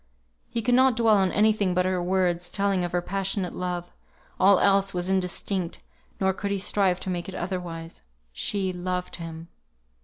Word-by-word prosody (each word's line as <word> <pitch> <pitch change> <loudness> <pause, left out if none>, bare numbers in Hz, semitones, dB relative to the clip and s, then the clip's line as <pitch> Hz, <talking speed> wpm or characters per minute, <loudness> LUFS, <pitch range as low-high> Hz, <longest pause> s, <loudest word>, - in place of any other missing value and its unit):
He 230 - -2
could 245 - +2
not 260 0 +5
dwell 225 -2 +4
on 190 -1 +2
any 215 +1 +4
thing 200 -4 0
but 180 0 +2
her 185 -1 0
words, 180 -1 0
telling 195 -2 0
of 175 - -2
her 175 0 0
passionate 195 0 -1
love; 175 -1 -4 0.5
all 195 0 +6
else 195 -1 +3
was 180 +1 -1
indistinct, 185 -1 -1 0.4
nor 190 0 +2
could 200 +2 -4
he 200 - 0
strive 190 -1 +1
to 190 - -3
make 175 +1 -4
it 190 - -7
otherwise. 175 -2 -5 0.3
She 190 - -1
loved 180 0 -3
him. 165 -1 -8
185 Hz, 180 wpm, -26 LUFS, 180-195 Hz, 0.5 s, all